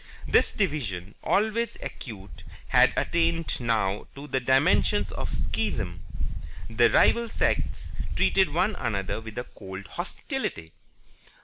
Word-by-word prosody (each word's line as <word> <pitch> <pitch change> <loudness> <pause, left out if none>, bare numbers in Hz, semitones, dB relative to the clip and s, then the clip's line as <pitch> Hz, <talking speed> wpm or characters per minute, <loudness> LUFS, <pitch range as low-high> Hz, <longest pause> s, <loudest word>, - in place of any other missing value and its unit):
This - - +4
division, 110 - -2
always 220 +3 +1
acute, 95 - -8 0.3
had - - +6
attained 165 -1 +1
now 110 -5 0
to 140 +1 -8
the 130 -2 0
dimensions 130 +2 +3
of - - -4
a - - -2
Schism. 95 -5 -2 0.6
The 115 +1 +4
rival 235 -1 +4
sects - - -1 0.2
treated 190 -5 +3
one 180 +7 +2
another 100 +1 -2
with 110 0 -9
a 120 - -1
cold 95 -4 -9
hostility. 80 -2 -4
120 Hz, 120 wpm, -27 LUFS, -, 0.6 s, had